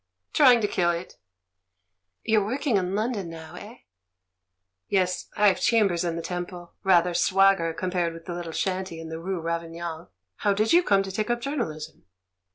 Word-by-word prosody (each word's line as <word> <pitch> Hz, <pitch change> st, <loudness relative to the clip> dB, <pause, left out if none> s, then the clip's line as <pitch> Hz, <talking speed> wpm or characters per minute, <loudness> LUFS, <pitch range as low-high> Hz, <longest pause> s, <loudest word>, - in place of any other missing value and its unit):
"Trying 255 Hz, -6 st, +6 dB
to 210 Hz, -, +1 dB
kill 175 Hz, -3 st, +1 dB
it." 170 Hz, +1 st, -4 dB, 1.1 s
"You're 220 Hz, -2 st, +3 dB
working 245 Hz, +2 st, 0 dB
in 185 Hz, 0 st, -1 dB
London 215 Hz, -4 st, -2 dB
now, 160 Hz, -1 st, -10 dB
eh?" 215 Hz, +4 st, -10 dB, 1.1 s
"Yes, 185 Hz, -2 st, 0 dB
I've 205 Hz, -2 st, +4 dB
chambers 200 Hz, -7 st, +3 dB
in 170 Hz, -1 st, -1 dB
the 170 Hz, -, -4 dB
Temple. 175 Hz, 0 st, -6 dB
Rather 180 Hz, -2 st, +4 dB
swagger 195 Hz, -2 st, +3 dB
compared 175 Hz, 0 st, -2 dB
with 165 Hz, -, -12 dB
the 175 Hz, -, -5 dB
little 170 Hz, -1 st, -5 dB
shanty 185 Hz, -1 st, -2 dB
in 165 Hz, 0 st, -8 dB
the 160 Hz, 0 st, -5 dB
rue 185 Hz, +1 st, -3 dB
Ravignan. 165 Hz, -, -4 dB, 0.3 s
How 200 Hz, -1 st, +1 dB
did 215 Hz, +6 st, +2 dB
you 350 Hz, -, +7 dB
come 200 Hz, -, +3 dB
to 195 Hz, -, -6 dB
take 215 Hz, +4 st, -2 dB
up 240 Hz, 0 st, +1 dB
journalism?" 235 Hz, -, -5 dB
185 Hz, 165 wpm, -26 LUFS, 170-210 Hz, 1.1 s, you